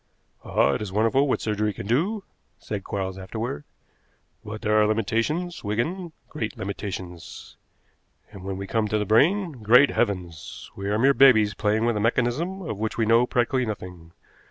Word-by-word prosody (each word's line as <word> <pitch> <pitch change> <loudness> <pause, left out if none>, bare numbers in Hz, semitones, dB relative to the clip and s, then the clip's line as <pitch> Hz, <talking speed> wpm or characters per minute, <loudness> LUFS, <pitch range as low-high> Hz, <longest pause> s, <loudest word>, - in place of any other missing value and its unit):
"Ah, - - +2
it - - -2
is 105 -3 -5
wonderful 115 +7 +2
what - - 0
surgery 105 0 0
can 95 - -7
do," 180 - 0 0.3
said 100 -2 -5
Quarles 95 -1 -4
afterward. 95 -5 -5 0.8
"But 110 +2 -7
there 110 -1 +3
are 105 - +4
limitations, 115 - -1
Wigan, 160 - -2 0.2
great 115 -8 -5
limitations. 95 -3 -7 0.8
And 100 -3 -11
when 95 0 -4
we 100 - -5
come 110 +2 0
to 105 - 0
the 105 - -1
brain, 150 - +2
great 125 +6 +6
heavens! 90 -8 -3
We 100 0 -4
are 105 - +1
mere 135 +5 +4
babies 110 -7 +6
playing 110 +2 0
with 120 -1 +1
a - - -1
mechanism 130 - 0
of 110 - -5
which 110 0 -3
we 115 - +2
know 115 +2 +4
practically 125 0 +1
nothing. 90 -5 -7
110 Hz, 170 wpm, -25 LUFS, 100-130 Hz, 0.8 s, great